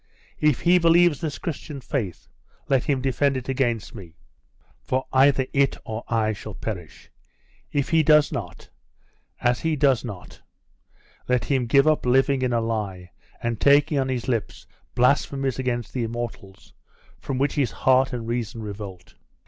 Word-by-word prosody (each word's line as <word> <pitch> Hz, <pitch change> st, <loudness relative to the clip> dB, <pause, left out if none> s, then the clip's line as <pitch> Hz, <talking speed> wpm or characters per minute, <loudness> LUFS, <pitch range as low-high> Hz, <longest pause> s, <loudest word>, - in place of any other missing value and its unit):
If 150 Hz, -5 st, +2 dB
he 180 Hz, +1 st, +5 dB
believes 170 Hz, -1 st, +4 dB
this 155 Hz, -3 st, -3 dB
Christian 150 Hz, -3 st, -6 dB
faith, 120 Hz, -, -4 dB, 0.4 s
let 135 Hz, -2 st, +2 dB
him 135 Hz, -3 st, 0 dB
defend 135 Hz, +1 st, +1 dB
it 130 Hz, -, -6 dB
against 120 Hz, -5 st, -1 dB
me; 90 Hz, -7 st, -11 dB, 0.7 s
for 130 Hz, +1 st, -2 dB
either 135 Hz, 0 st, +4 dB
it 140 Hz, -1 st, +2 dB
or 110 Hz, +1 st, -5 dB
I 110 Hz, -2 st, +1 dB
shall 105 Hz, 0 st, -9 dB
perish. 90 Hz, -8 st, -7 dB, 0.6 s
If 140 Hz, -2 st, -1 dB
he 165 Hz, -1 st, +4 dB
does 150 Hz, -1 st, +4 dB
not 90 Hz, -7 st, -6 dB, 0.7 s
as 120 Hz, 0 st, +2 dB
he 160 Hz, -1 st, 0 dB
does 135 Hz, -5 st, +2 dB
not 100 Hz, -7 st, -9 dB, 0.9 s
let 125 Hz, -3 st, +1 dB
him 130 Hz, -4 st, 0 dB
give 140 Hz, +4 st, +4 dB
up 155 Hz, -1 st, +2 dB
living 135 Hz, +2 st, +3 dB
in 125 Hz, -1 st, 0 dB
a 115 Hz, -1 st, +1 dB
lie, 100 Hz, -6 st, -4 dB, 0.3 s
and 115 Hz, -2 st, -2 dB
taking 145 Hz, +1 st, +4 dB
on 135 Hz, -1 st, -1 dB
his 125 Hz, -3 st, -3 dB
lips 115 Hz, -5 st, -3 dB, 0.3 s
blasphemies 135 Hz, +1 st, +1 dB
against 120 Hz, -2 st, -2 dB
the 125 Hz, -3 st, -1 dB
immortals, 115 Hz, -4 st, -7 dB, 0.5 s
from 135 Hz, -, -4 dB
which 140 Hz, +2 st, +1 dB
his 140 Hz, -5 st, +1 dB
heart 130 Hz, +3 st, +2 dB
and 120 Hz, -3 st, -5 dB
reason 115 Hz, -1 st, -3 dB
revolt! 100 Hz, -3 st, -8 dB
130 Hz, 155 wpm, -24 LUFS, 115-140 Hz, 0.9 s, he